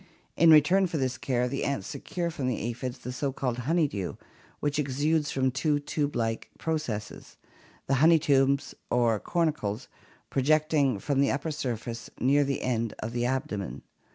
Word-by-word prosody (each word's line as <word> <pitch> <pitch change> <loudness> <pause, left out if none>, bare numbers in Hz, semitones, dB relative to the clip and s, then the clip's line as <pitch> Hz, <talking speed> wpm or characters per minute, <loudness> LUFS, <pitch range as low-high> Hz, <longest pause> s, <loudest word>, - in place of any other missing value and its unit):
In 165 +1 +5
return 170 +5 +6
for 165 - -3
this 130 -2 0
care 125 -2 0
the 135 +2 -3
ants 140 -9 -1
secure 170 -1 -4
from 140 -5 -3
the 125 - 0
aphids 120 +2 -4
the 125 - -7
so 135 +2 -2
called 125 -2 -2
honey 155 +5 +2
dew 100 -8 -4 0.4
which 145 0 -1
exudes 145 +2 +1
from 130 -1 +1
two 145 +3 +1
tube 145 0 -2
like 115 -1 -2
processes, 140 -10 -4 0.5
the 135 - 0
honey 165 +1 +7
tubes 140 -2 +2 0.2
or 120 -3 +2
cornicles, 145 - -1 0.4
projecting 145 -2 +2
from 140 +7 0
the 140 - +3
upper 145 +4 -1
surface 120 -5 -4
near 140 +3 +4
the 140 0 -2
end 115 -3 -1
of 115 +2 -5
the 120 0 0
abdomen. 130 -7 -3
135 Hz, 165 wpm, -28 LUFS, 120-150 Hz, 0.5 s, honey